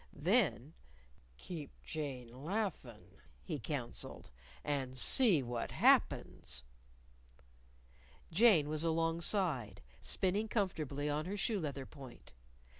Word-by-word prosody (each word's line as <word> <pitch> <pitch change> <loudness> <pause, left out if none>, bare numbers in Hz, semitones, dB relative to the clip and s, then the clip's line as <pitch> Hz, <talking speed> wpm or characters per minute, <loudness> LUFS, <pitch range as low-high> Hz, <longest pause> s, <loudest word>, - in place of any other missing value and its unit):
Then, 160 - +1 0.6
"Keep 155 - -8
Jane 130 -4 -6
laughin'," 175 - -4 0.2
he - - -3
counseled, - - -5 0.2
" - - -22
and 130 -2 -4
see 195 - +5
what 120 -1 -3
happens." 65 0 +2 1.7
Jane 180 -5 +6
was 155 +1 0
alongside, 165 - 0 0.2
spinning 200 +4 0
comfortably 155 - -1
on 150 +1 -1
her 200 +3 -3
shoe 205 +1 0
leather 140 -5 -4
point. 130 - -13
155 Hz, 100 wpm, -35 LUFS, 130-190 Hz, 1.7 s, Jane